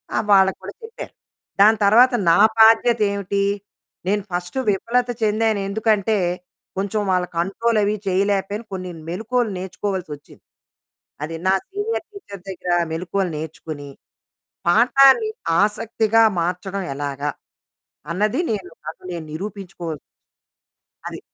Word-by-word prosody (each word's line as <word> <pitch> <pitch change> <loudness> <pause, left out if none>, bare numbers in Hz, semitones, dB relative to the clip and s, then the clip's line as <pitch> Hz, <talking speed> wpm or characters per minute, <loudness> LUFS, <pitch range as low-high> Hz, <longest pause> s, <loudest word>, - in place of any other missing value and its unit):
ఆహ్, - - 0
వాళ్ళకి 190 -1 +4
కూడా - - -7
చెప్పారు. 450 0 -9 0.5
దాని 215 +2 +7
తర్వాత 240 +5 +6 0.2
నా 170 - +4 0.2
బాధ్యత 225 +1 +6
ఏమిటి, 200 0 -1 0.7
నేను 205 -1 +1
ఫస్టు 175 +8 -3
విఫలత 240 +5 0
చెందాను. 215 0 +1
ఎందుకంటే, 215 0 +1 0.6
కొంచెం 200 +2 -1
వాళ్ళ 180 -1 +2
కంట్రోలవి 210 +3 +1
చేయలేకపోయాను. 200 +3 0
కొన్ని 185 -1 -5 0.2
మెళకువలు 225 +4 -1
నేర్చుకోవాల్సొచ్చింది. 185 -5 -6 0.8
అది 165 +2 -5
నా 190 - +5 0.2
సీనియర్ 410 +3 -3
టీచర్ 200 - -11
దగ్గర 180 -1 -5 0.2
మెళకువలు 180 +3 -2
నేర్చుకొని, 155 -1 -7 0.8
పాఠాన్ని 270 - +5 0.3
ఆసక్తిగా 220 +1 +2 0.2
మార్చడం 185 +3 -3
ఎలాగా, 145 0 -3 0.8
అన్నది 210 - 0
నేను 195 -4 -3 0.2
నాకు 155 - -7
నేను 170 -2 -5
నిరూపించుకోవాలసొచ్చింది. 180 -3 -6 1.1
అది. - - -6
200 Hz, 105 wpm, -21 LUFS, 180-220 Hz, 1.1 s, దాని